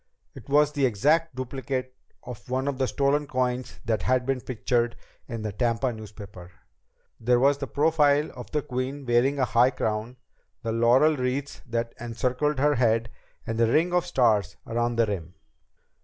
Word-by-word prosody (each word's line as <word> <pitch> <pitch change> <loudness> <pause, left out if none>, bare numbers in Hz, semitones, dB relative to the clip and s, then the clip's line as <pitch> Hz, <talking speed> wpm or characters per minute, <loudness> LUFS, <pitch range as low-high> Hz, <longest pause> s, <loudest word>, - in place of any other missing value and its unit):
It - - -13
was 150 +1 +4
the 140 -3 +2
exact 150 +7 +1
duplicate 130 0 -4 0.3
of 125 -1 -10
one 130 +2 -1
of 140 -2 -2
the 130 - +2
stolen 140 +4 +1
coins 125 -8 -2
that 110 -3 0
had 130 -1 +1
been 135 -1 -1
pictured 120 -1 -1 0.3
in 115 -3 -5
the 105 - -2
Tampa 120 +3 0
newspaper. 100 -4 -11 0.7
There 120 +1 +3
was 140 +2 +3
the 140 - -4
profile 150 +2 +2
of - - -10
the 150 -1 -1
queen 135 0 -4
wearing 125 +4 +2
a 130 - +2
high 120 +2 +4
crown, 110 0 -3 0.5
the 115 - -2
laurel 120 +7 +4
wreaths 130 +2 -3
that 115 0 -2
encircled 125 +5 -1
the 145 +1 +2
head, 115 -1 +2 0.3
and 115 0 -3
the 115 - +4
ring 170 +5 +2
of 180 -1 +1
stars 105 -7 +2
around 120 +1 -1
the 115 0 +3
rim. 90 -5 -5
125 Hz, 170 wpm, -26 LUFS, 115-140 Hz, 0.7 s, was